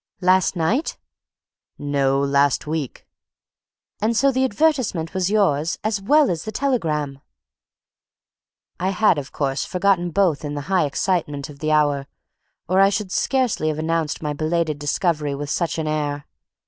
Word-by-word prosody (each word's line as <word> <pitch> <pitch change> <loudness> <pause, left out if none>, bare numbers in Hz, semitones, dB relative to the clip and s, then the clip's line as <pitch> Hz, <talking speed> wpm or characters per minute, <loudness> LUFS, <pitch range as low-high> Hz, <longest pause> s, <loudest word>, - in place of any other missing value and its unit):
"Last 185 +1 +3
night?" 205 - 0 0.8
"No, 140 -2 +1
last 140 0 +2
week." 150 -3 -4 1.0
"And 225 +2 +1
so 275 +2 +4
the 260 0 +1
advertisement 255 - 0
was 185 -1 0
yours, 170 -7 +1
as 210 -2 -1
well 290 +5 +4
as 165 -2 -3
the 215 - -5
telegram!" 155 - -1 1.6
I 185 +2 0
had, 195 -4 +3
of 140 - -8
course, 135 -2 -1
forgotten 180 -1 +1
both 175 -5 +1
in 145 0 -4
the 145 - -3
high 185 -4 +3
excitement 150 -3 -2
of 140 - -15
the 155 0 -1
hour, 145 -2 +2 0.6
or 185 +3 +2
I 195 - +6
should 200 -1 -3
scarcely 255 - 0
have 155 -1 -1
announced 160 -1 -1
my 150 -1 -1
belated 155 0 -1
discovery 150 -1 0
with 145 0 -5
such 170 -2 -1
an 160 - -2
air. 145 -1 -2
165 Hz, 150 wpm, -22 LUFS, 145-195 Hz, 1.6 s, I